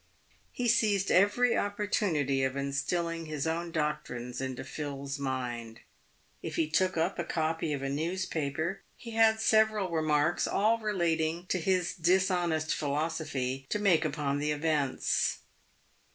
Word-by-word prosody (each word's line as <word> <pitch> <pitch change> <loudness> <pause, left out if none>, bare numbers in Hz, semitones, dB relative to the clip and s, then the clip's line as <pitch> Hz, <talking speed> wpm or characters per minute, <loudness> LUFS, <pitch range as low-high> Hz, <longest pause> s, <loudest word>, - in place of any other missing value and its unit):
He 245 - -2
seized 210 -4 +2
every 205 +6 +4
opportunity 190 -9 0
of 130 0 0
instilling 165 +4 -2
his 150 -2 -3
own 165 +1 -2
doctrines 130 -6 -3
into 130 -1 -4
Phil's 140 0 -5
mind. 120 -4 -4 0.6
If - - -5
he 160 - +1
took 185 +3 +1
up 170 +4 0
a - - 0
copy 160 -1 -1
of 140 -2 -2
a - - -1
newspaper, 160 +2 -2 0.2
he 230 - -9
had 225 0 +4
several 215 -4 +3
remarks, 155 -2 +1
all 220 +3 +2
relating 170 -5 0
to 185 - +1
his 180 0 +1
dishonest 175 -3 +1
philosophy, 140 -3 -2
to - - 0
make 185 -6 +3
upon 145 -2 -1
the 150 +1 -1
events. 150 -2 0
160 Hz, 135 wpm, -30 LUFS, 140-185 Hz, 0.6 s, every